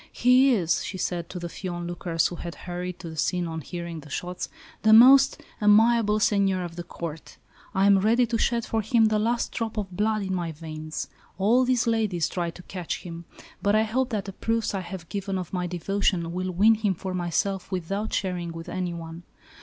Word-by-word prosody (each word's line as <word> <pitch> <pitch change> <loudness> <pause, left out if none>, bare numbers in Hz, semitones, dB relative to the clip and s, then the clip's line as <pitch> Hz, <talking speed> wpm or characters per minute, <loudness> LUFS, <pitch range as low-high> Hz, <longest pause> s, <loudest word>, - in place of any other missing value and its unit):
"He 255 +2 +5
is," 175 -5 +1
she 190 - -5
said 175 -1 -3
to 180 - -6
the 175 -1 -4
few 185 +2 -6
onlookers 175 -1 -2
who 175 - -1
had 170 0 -6
hurried 180 0 -4
to 170 - -7
the - - -9
scene 180 +3 0
on 160 -1 -5
hearing 170 +1 -6
the 150 0 -13
shots, 180 +5 -4 0.3
"the 220 0 +5
most 265 +4 +8 0.2
amiable 215 0 +5
seigneur 195 -3 +2
of 170 -1 -7
the 175 - -5
Court. 165 -2 -8 0.4
I 190 +1 +3
am 200 -1 +6
ready 230 +5 +3
to 230 0 -1
shed 235 -1 +1
for 225 - -1
him 225 +2 +3
the 215 0 +1
last 235 +2 0
drop 225 -1 -4
of 200 -3 -3
blood 215 +1 +1
in 190 -1 -2
my 170 -3 -2
veins. 155 -2 -6 0.3
All 230 +7 +3
these 250 -2 +2
ladies 215 -8 +1
try 175 -2 -2
to 180 +2 -11
catch 180 -3 -5
him, 170 -1 -8 0.4
but 205 +1 +2
I 215 - +4
hope 245 +4 0
that 215 -5 -2
the 195 - -7
proofs 225 +2 -1
I 195 - -1
have 175 -1 -8
given 195 0 -3
of 180 -1 -6
my 180 -1 -1
devotion 180 -1 -1
will 185 +1 -2
win 200 +5 +5
him 210 -3 0
for 185 +2 -5
myself 185 +2 -1
without 195 +4 -3
sharing 180 -3 -2
with 165 0 -8
anyone. 170 -2 -5
190 Hz, 210 wpm, -26 LUFS, 175-215 Hz, 0.4 s, most